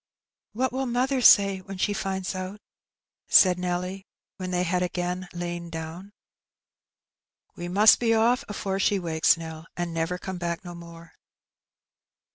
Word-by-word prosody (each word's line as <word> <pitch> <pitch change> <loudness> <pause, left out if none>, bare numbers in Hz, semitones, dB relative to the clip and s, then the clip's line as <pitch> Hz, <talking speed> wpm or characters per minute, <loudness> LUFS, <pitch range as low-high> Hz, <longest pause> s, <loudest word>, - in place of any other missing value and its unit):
" - - -68
What 255 +4 0
will 265 0 -2
mother 255 +2 0
say 195 -4 +6
when 195 +1 -9
she 205 +2 0
finds 190 -1 -3
out? 185 +2 -6 0.4
" - - -68 0.2
said 180 -2 +6
Nelly, 180 +2 -3 0.3
when 185 -1 -5
they 180 0 0
had 180 0 0
again 180 0 -3
lain 175 -1 -5
down. 165 +2 -7
'^ 200 - -20 1.4
We 175 - -6
must 205 +5 +6
be 240 - -1
oflF 230 +4 +3
afore 195 -1 -3
she 200 +1 +2
wakes, 165 -2 +2
Nell, 160 0 -8
and 175 -1 -3
never 165 +2 -2
come 185 0 -6
back 170 +2 -4
no 175 - -7
more." 170 -1 -12
180 Hz, 160 wpm, -26 LUFS, 175-200 Hz, 1.4 s, say